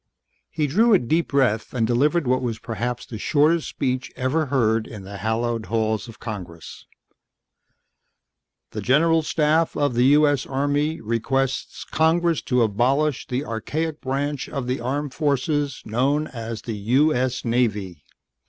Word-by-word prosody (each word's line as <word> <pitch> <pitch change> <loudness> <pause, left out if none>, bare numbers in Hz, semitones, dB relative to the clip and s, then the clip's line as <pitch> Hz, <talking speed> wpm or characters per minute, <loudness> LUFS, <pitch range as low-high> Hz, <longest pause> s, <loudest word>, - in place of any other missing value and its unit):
He 155 -2 -1
drew 215 - +4
a - - +7
deep 160 +5 0
breath 125 -5 +1
and 115 -2 +2
delivered 145 +8 +2
what 130 +1 +1
was 120 -3 -2
perhaps 120 +2 -4
the 110 - -8
shortest 155 +5 +2
speech 130 -1 -2
ever 145 +5 0
heard 115 -4 +1
in 105 -4 -9
the 100 +1 -8
hallowed 110 +2 -1
halls 110 0 -1
of 115 - -12
Congress: 90 -7 -8 1.8
"The - - -5
General 160 +5 +3
Staff 155 +1 +1
of 145 -3 +1
the 120 +1 +3
U.S. 145 -3 +2
Army 145 +3 0
requests 130 +4 -1
Congress 165 0 +2
to 125 -2 +2
abolish 130 +7 +1
the 130 +3 -2
archaic 150 +8 -3
branch 140 +1 -2
of 135 -4 -4
the 125 +1 -2
armed 135 +3 -3
forces 145 -1 -1
known 135 +7 +1
as 115 -5 -6
the 115 - -4 0.2
U.S. 130 -4 +1
Navy." 105 - -1
130 Hz, 145 wpm, -23 LUFS, 115-150 Hz, 1.8 s, a